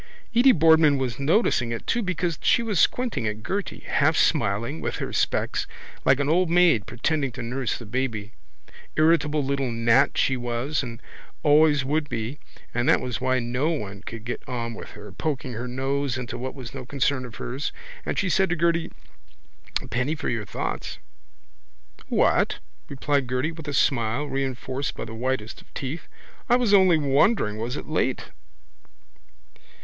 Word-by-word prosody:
Edy 255 +3 +7
Boardman 160 - +5
was 130 -2 -2
noticing 140 - +2
it 115 - -4
too 235 - +1
because 175 -4 -2
she 235 - +3
was 210 -7 0
squinting 225 - +1
at 105 0 -4
Gerty, 195 - -3
half - - +2
smiling, 100 -4 +1
with - - -2
her - - -4
specs - - 0 0.4
like 130 +1 +5
an 140 - 0
old 175 +3 +3
maid, 170 - +4
pretending 135 +4 -1
to 125 - -6
nurse 125 +1 -2
the 120 - -10
baby. 110 -2 -3 0.6
Irritable 155 -2 +3
little 135 -1 0
gnat 115 +4 +3
she 135 - +2
was 120 +4 -1
and 120 -3 -7 0.4
always 150 -2 +5
would 150 +2 0
be 115 +6 -4 0.3
and 120 +5 +1
that - - +5
was 125 -1 -4
why 130 0 +2
no 125 +5 0
one 100 - -4
could 115 +1 -8
get 120 - -4
on 115 -2 -3
with - - -9
her 105 -1 -10
poking 135 - -3
her 120 +3 -4
nose 135 +1 -1
into 120 -2 -5
what 130 +3 -5
was 130 -4 -8
no 135 -1 -6
concern 135 0 0
of 120 -3 -9
hers. 130 +4 -4 0.3
And - - -3
she 205 - +1
said 190 +1 +2
to 175 - +1
Gerty: 170 0 +1 0.9
—A - - -9
penny 130 +7 -1
for - - -3
your 115 -3 -2
thoughts. 100 - -4 1.1
—What? - - +2 0.3
replied 140 -1 0
Gerty 130 +5 0
with 160 -2 -10
a - - -2
smile 120 0 +1
reinforced 135 -1 -3
by - - -5
the 110 - -8
whitest 115 -3 -3
of - - -24
teeth. 145 +4 -5 0.4
I 240 - +6
was 245 -4 +2
only 190 -4 +6
wondering 140 - +2
was 120 +5 -3
it - - -6
late. 145 -4 -1
135 Hz, 170 wpm, -25 LUFS, 120-155 Hz, 1.1 s, Edy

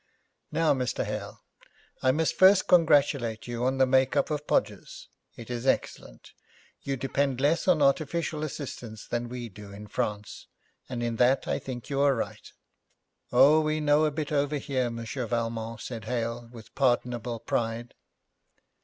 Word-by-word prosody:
'Now, 165 -2 +3
Mr. 125 -3 -2
Hale, 105 -1 -6 0.6
I 130 - +3
must 160 +3 +1
first 190 +1 +6
congratulate 145 -9 +3
you 120 0 -3
on 130 +1 +1
the 130 - +5
make 130 +1 +2
up 140 +2 +1
of 150 0 -3
Podgers. - - -2 0.3
It 115 +1 -9
is 120 +2 -3
excellent. - - -2 0.5
You 135 -1 -3
depend 135 0 -1
less 150 +7 +1
on 165 -5 +4
artificial 155 +2 0
assistance 125 -7 -6
than 120 0 -3
we 120 -1 -5
do 105 -1 -12
in 100 +1 -9
France, 105 0 -4 0.4
and 120 -2 -3
in 115 -1 -2
that 125 +3 +3
I - - 0
think 125 0 -7
you 140 0 +1
are 140 -1 +4
right.' 115 - -5 0.8
'Oh, 140 +5 +6
we 155 0 0
know 150 +1 +3
a - - +2
bit 150 0 -4
over 145 0 +1
here, 130 -3 -1
Monsieur 115 +2 -5
Valmont,' 115 -1 -3
said 115 -4 -6
Hale, 115 0 -3
with 115 -2 -13
pardonable 120 -3 0
pride. 115 +1 -2
125 Hz, 160 wpm, -27 LUFS, 115-145 Hz, 0.8 s, first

